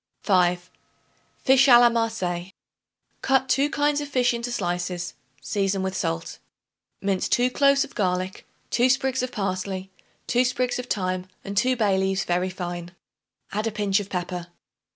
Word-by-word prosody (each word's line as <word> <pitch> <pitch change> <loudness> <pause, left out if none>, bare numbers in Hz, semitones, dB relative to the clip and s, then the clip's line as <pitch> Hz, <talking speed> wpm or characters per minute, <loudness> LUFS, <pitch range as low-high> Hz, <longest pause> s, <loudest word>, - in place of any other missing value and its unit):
5. 180 -2 +2 0.7
Fish 265 +1 +5
a 245 -3 +9
la 240 0 +7
Marseilles. 190 -6 -1 0.7
Cut 265 0 +2
two 275 +3 +2
kinds 290 0 +1
of 290 - -5
fish 250 -3 +2
into 235 +1 -3
slices; 175 -4 -2 0.3
season 195 +1 0
with 190 0 -2
salt. 80 - -3 0.6
Mince 195 -2 0
2 250 +1 +2
cloves 275 +1 +4
of - - -10
garlic, 185 -2 -2 0.2
2 245 +2 +3
sprigs 265 0 +1
of 255 0 -3
parsley, 190 -1 -3 0.3
2 245 +1 +2
sprigs 250 0 0
of 250 - -5
thyme 185 -4 -2 0.2
and 200 0 -5
2 255 +5 +3
bay 205 -5 +2
leaves 190 -1 0
very 180 +1 0
fine. 175 -1 -6 0.6
Add 215 +2 -1
a - - -1
pinch 205 -1 +1
of 200 -1 -6
pepper. 180 -1 -4
200 Hz, 155 wpm, -24 LUFS, 185-250 Hz, 0.7 s, a